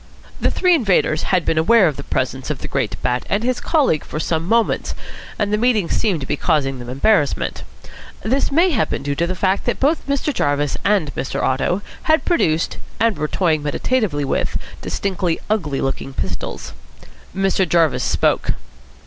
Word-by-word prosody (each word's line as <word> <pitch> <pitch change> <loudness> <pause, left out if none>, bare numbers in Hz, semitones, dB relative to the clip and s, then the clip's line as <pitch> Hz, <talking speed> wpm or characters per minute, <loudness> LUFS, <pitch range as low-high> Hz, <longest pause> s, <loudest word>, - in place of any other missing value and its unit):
The - - +2
three 365 -1 +3
invaders 195 - +2
had 180 -3 +2
been 160 - +2
aware 200 +3 +5
of 150 - -1
the 140 - -7
presence 130 +1 -2
of 150 - -1
the - - -7
great 105 - -2
Bat 125 0 0
and 205 +3 0
his 250 0 0
colleague 280 - +2
for 155 - -5
some 160 +1 -1
moments, 230 +2 +1 0.4
and 210 -1 0
the 210 - +2
meeting 220 -7 +2
seemed 190 -9 +1
to - - -4
be - - -1
causing 135 -4 0
them 120 0 -8
embarrassment. 145 +4 +1 0.6
This 260 +8 +1
may 340 +6 +4
have 235 -8 +1
been - - -3
due 140 0 -1
to 170 +4 0
the 185 - -2
fact 190 +1 0
that - - -1
both 290 +3 +1
Mr. 280 +1 0
Jarvis 145 - 0
and 195 -8 +1
Mr. 130 - -3
Otto 140 +9 0 0.3
had 315 +1 +3
produced 165 - +1 0.2
and 230 -2 +2
were 150 - -2
toying 160 -3 +1
meditatively 150 - 0
with 135 - -1 0.2
distinctly 185 -4 -1
ugly 155 -11 0
looking 135 0 -3
pistols. - - -4 0.6
Mr. 195 -2 +1
Jarvis 155 -8 +3
spoke. - - +1
175 Hz, 180 wpm, -20 LUFS, 145-220 Hz, 0.6 s, aware